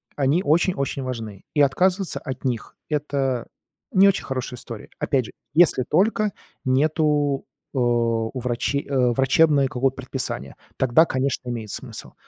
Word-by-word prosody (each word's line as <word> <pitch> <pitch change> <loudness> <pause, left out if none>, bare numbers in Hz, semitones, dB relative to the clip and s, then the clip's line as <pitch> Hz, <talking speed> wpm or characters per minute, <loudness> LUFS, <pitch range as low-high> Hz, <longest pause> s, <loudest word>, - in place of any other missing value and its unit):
они 145 +6 +2
очень-очень 150 -3 +1
важны, 115 -6 -6
и 145 - +4
отказываться 180 +6 +2
от 130 -2 -7
них- 120 -3 -3
это 140 -5 -1 0.4
не 195 +1 +6
очень 195 - +2
хорошая 130 -2 -4
история. 115 -4 -5
Опять 130 -4 +1
же, - - -10 0.2
если 165 -5 +5
только 205 - +1 0.3
нету, 145 +1 +2 0.3
э, - - -5
у 115 0 +1
врачи 125 +3 -1
э, 130 -3 +3
врачебное 135 +3 +4
какое-то 130 +1 0
предписание. 135 0 -5 0.2
Тогда, 130 +5 +5
конечно, 130 -3 -2
имеет 115 -4 -5
смысл. - - -8
135 Hz, 135 wpm, -23 LUFS, 125-150 Hz, 0.4 s, не